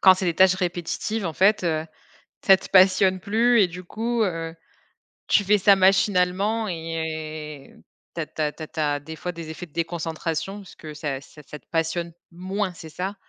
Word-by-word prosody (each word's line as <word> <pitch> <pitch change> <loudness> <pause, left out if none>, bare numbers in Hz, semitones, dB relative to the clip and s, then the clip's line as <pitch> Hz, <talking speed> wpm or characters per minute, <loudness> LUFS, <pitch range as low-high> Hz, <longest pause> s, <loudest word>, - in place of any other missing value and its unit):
quand 190 -1 +8
c'est 185 - -4
des 170 -2 +1
tâches 185 0 +6
répétitives 180 +3 -2
en 165 - -3
fait, 195 +2 +3
heu, 160 -1 0 0.6
ça 195 -1 +8
te - - -11
passionne 185 0 +5
plus 230 +4 +3
et 185 - +4
du 180 +2 -9
coup, 230 +4 -1
heu, 165 -2 -4 0.7
tu 205 - +4
fais 210 +2 +4
ça 200 0 +6
machinalement 195 +3 +2
et 160 -3 -5 0.4
tu - - -2
as 155 - -2
tu 155 - -5
as 150 - +1
tu 160 - -10
as - - -9
tu 155 - -6
as 145 -1 +1
des 160 +3 -9
fois 180 +3 -5
des 165 -2 -8
effets 175 +3 -7
de 155 - -28
déconcentration 165 +2 -3
parce 200 -2 -12
que 155 -1 -9
ça 145 -3 -4
ça 150 +2 -15
ça 150 - -9
te - - -40
passionne 165 +1 -1 0.2
moins 190 +2 -3
c'est 160 - -10
ça? 185 +5 -4
175 Hz, 205 wpm, -24 LUFS, 160-195 Hz, 0.7 s, quand